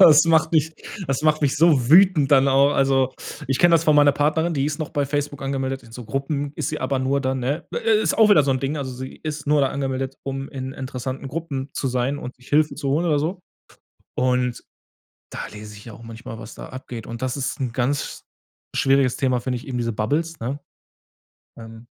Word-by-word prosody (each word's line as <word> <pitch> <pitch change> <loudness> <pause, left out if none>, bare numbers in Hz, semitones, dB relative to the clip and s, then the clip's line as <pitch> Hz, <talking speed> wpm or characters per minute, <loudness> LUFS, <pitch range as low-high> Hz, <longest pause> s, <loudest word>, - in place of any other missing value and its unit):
Das 160 -4 +8
macht 160 -1 +3
mich 160 -1 +2 0.3
das 135 +1 -1
macht 155 0 +3
mich 140 -3 +2
so 150 -7 +4
wütend 170 -4 +6
dann 135 0 +6
auch. 135 +1 +4
Also, 135 -2 +2 0.3
ich 135 0 0
kenne 175 -1 +6
das 165 0 +3
von 155 - +4
meiner 145 -1 +6
Partnerin, 155 +4 +1
die 140 -2 0
ist 150 +1 -2
noch 155 - -3
bei 145 -1 0
Facebook 145 0 -3
angemeldet, 135 -1 -3
in 115 - -16
so 125 +1 -8
Gruppen 140 +3 -3
ist 150 - -2
sie - - -4
aber 130 +1 0
nur 135 +2 +1
dann, 130 -1 -1
ne? 140 +6 -2
Ist 220 -1 +1
auch 220 - +7
wieder 180 -8 +6
so 140 - 0
'n 130 - +1
Ding. 140 +3 -2
Also, 135 -3 -4
sie 130 +1 -8
ist 150 -1 -5
nur 150 0 +3
da 135 - +3
angemeldet, 135 -1 -3
um 135 0 -4
in 130 -2 -6
interessanten 130 +1 -5
Gruppen 140 -2 -4
zu - - -3
sein 130 +3 0
und 125 - -7
sich 125 0 -19
Hilfe 150 +1 +3
zu 140 - -4
holen 155 +6 +1
oder 150 -3 +2
so. 175 +5 -2 0.8
Und 125 -1 0 0.7
da - - -6
lese 105 0 -10
ich 100 - -13
ja 115 - -9
auch - - -13
manchmal, 115 0 -9
was 110 0 -10
da - - -9
abgeht. 125 -3 -8
Und 115 +1 -7
das 130 +1 -2
ist 140 +3 -3
'n 130 -3 -2
ganz 130 +4 -2 0.5
schwieriges 135 -2 +3
Thema, 130 -2 +1
finde 125 0 -2
ich, 120 - -11
eben 130 -2 -3
diese 115 -2 -1
Bubbles, 155 +10 -1
ne? 130 +5 -3 1.0
Ähm 115 0 -11
135 Hz, 220 wpm, -22 LUFS, 130-150 Hz, 1.0 s, Das